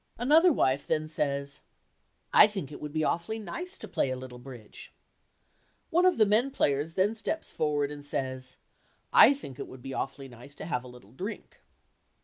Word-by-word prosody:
Another 310 +9 +5
wife 140 - +1
then 155 0 0
says, 140 -2 -2 0.7
"I 475 - +9
think 195 -9 -6
it 145 - -9
would 150 - -5
be 155 +1 -1
awfully 170 +8 -1
nice 345 - -6
to - - -7
play - - 0
a 130 - -2
little 130 -1 -9
bridge." 120 -4 -11 1.0
One 355 +3 +4
of 365 - +3
the 215 - +6
men 220 +6 +3
players 150 - 0
then 195 +3 +2
steps 225 +8 -3
forward 145 -2 0
and 145 -1 -8
says 130 -2 -4 0.6
"I 280 - +8
think 135 - -10
it - - -5
would 130 -1 -12
be 135 0 -6
awfully 135 +1 -4
nice 125 +3 -12
to - - -8
have 140 -7 -2
a - - -11
little 125 -5 -14
drink." 190 - -7
150 Hz, 185 wpm, -29 LUFS, 130-215 Hz, 1.0 s, I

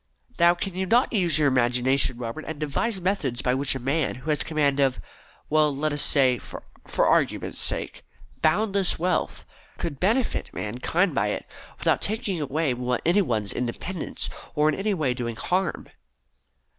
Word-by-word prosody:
Now, 170 +1 +6
can 190 +2 -4
you 190 +1 -2
not 240 +5 +3
use 175 -8 +3
your 150 -2 +3
imagination, 125 0 +2
Robert, 120 +6 -5
and 160 -2 -5
devise 190 +8 -1
methods 175 -10 -1
by 125 - +2
which 135 +1 +1
a - - -3
man 140 +6 0
who 130 +5 -3
has 150 - +1
command 145 -3 +1
of 135 -7 +2 0.5
well, 155 -1 +3
let 155 +1 0
us 145 - -1
say, 130 -4 +3
for - - -10 0.3
argument's - - +2
sake, - - -2 0.4
boundless 195 +3 +2
wealth, 180 0 -1 0.3
could 145 -5 -4
benefit 230 +7 0
mankind 150 - 0
by 105 -5 +1
it, 105 - -3 0.3
without - - +1
taking 200 -5 -1
away 145 0 0 0.3
any 175 +5 +4
one's 110 - -1
independence 150 +8 -4 0.3
or 150 0 +3
in - - +1
any 200 +3 -1
way 145 -7 0
doing 120 -2 -4
harm?" 180 +6 -1
155 Hz, 160 wpm, -25 LUFS, 130-180 Hz, 0.5 s, Now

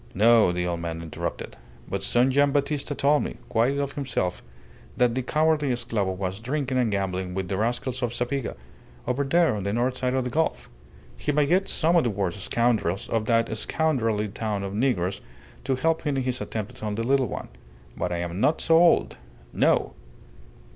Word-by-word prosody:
"No," 110 -1 +5
the 90 0 -2
old 85 -1 -2
man 85 -1 -4
interrupted. 80 - -5 0.3
"But - - -3
son 125 +2 +3
Gian' 140 +1 +3
Battista 145 0 -1
told 145 +2 +3
me - - -5
quite 120 +5 +2
of 140 -1 -1
himself 120 -10 -2 0.6
that 125 -1 +3
the 130 - -1
cowardly 150 +1 +1
esclavo 115 -6 -1
was 95 +1 -3
drinking 130 +2 -1
and 120 -3 +2
gambling 95 -2 -2
with 95 -1 -3
the 95 - -1
rascals 120 +4 -1
of 120 -2 0
Zapiga, 125 +2 -2 0.5
over 135 +3 0
there 165 -1 +3
on 105 - -3
the 100 +1 -2
north 125 +2 0
side 125 0 0
of 130 - +1
the 125 - -4
gulf. 160 +5 -1 0.5
He - - -1
may 150 0 +3
get 185 +6 +2
some 165 +2 +2
of 170 - +5
the 120 - +1
worst 100 -3 -2
scoundrels 110 -4 0
of 110 -2 -1
that 115 -1 +2
scoundrelly 115 -6 0
town 105 0 -3
of 100 0 -4
negroes 100 -5 0 0.4
to 135 0 +1
help 160 +5 +1
him 145 -3 -1
in 130 - 0
his 130 -2 -2
attempt 105 0 -5
upon 105 -1 -3
the 115 +2 -2
little 135 0 +2
one.... - - -6 0.5
But - - -2
I 85 - -1
am 85 +3 -4
not 155 - +3
so 165 0 +4
old. 175 0 +4 0.4
No!" - - +2
120 Hz, 195 wpm, -25 LUFS, 100-140 Hz, 0.6 s, No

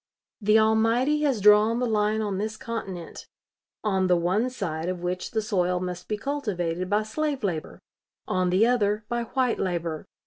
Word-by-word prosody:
The 215 +1 +4
Almighty 225 +7 +3
has 265 -6 +1
drawn 210 +3 +6
the 250 - 0
line 215 -1 +1
on 200 -3 -2
this 215 +1 -3
continent, 195 -8 -6 0.6
on 190 -3 +1
the 180 - +4
one 190 +8 +1
side 175 -9 -3
of 180 -1 -4
which 180 +1 -2
the 220 - -1
soil 180 -4 0
must 180 -1 -5
be 210 - -2
cultivated 185 - -2
by 210 +1 +2
slave 280 +4 -2
labor; 170 -6 -3 0.5
on 185 -1 +1
the 190 +5 +4
other 215 -3 +1
by 240 -1 -1
white 250 0 0
labor. 170 -4 -2
210 Hz, 170 wpm, -26 LUFS, 180-230 Hz, 0.6 s, drawn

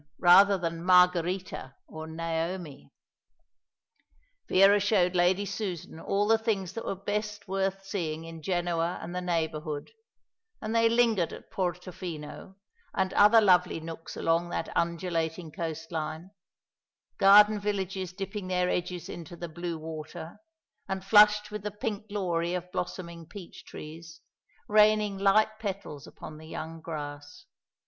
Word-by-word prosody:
rather 195 +3 +7
than 170 -1 -4
Margherita 180 -5 +2
or 160 0 -8
Naomi. 165 -1 -4 1.6
Vera 195 +2 +6
showed 190 -3 +2
Lady 180 +3 +3
Susan 190 -5 -5
all 200 +4 0
the 225 0 +4
things 200 -5 -1
that 230 - -6
were - - -2
best 205 +1 -4
worth 195 0 -2
seeing 165 -5 -3
in 165 -1 -9
Genoa 175 0 -1
and 175 - -7
the 180 - -2
neighbourhood, 160 -4 -2 0.7
and 220 0 -4
they 230 0 +5
lingered 225 -7 +2
at - - -11
Porto 180 0 -3
Fino, 170 +1 -8 0.4
and 190 -1 0
other 210 +3 +7
lovely 180 -5 +4
nooks 165 0 -8
along 165 +1 +1
that - - -4
undulating 170 -1 -1
coastline; 160 0 -5 0.9
garden 210 +1 +7
villages 195 -3 -3
dipping 195 +1 -5
their 180 -1 +1
edges 180 -1 -3
into 170 0 -8
the 175 0 -6
blue 170 +1 -4
water, 160 +1 -8 0.5
and 190 0 -3
flushed 210 0 +6
with 210 -1 -5
the 210 - -3
pink 210 +1 -5
glory 175 -4 -1
of 180 0 -5
blossoming 170 -3 -5
peach 200 -5 -11
trees, 165 +2 -10 0.5
raining 210 -1 +4
light 215 +2 +3
petals 195 -9 -5
upon 155 0 -10
the 160 - -12
young 160 0 -7
grass. 145 -2 -7
180 Hz, 135 wpm, -28 LUFS, 165-200 Hz, 1.6 s, rather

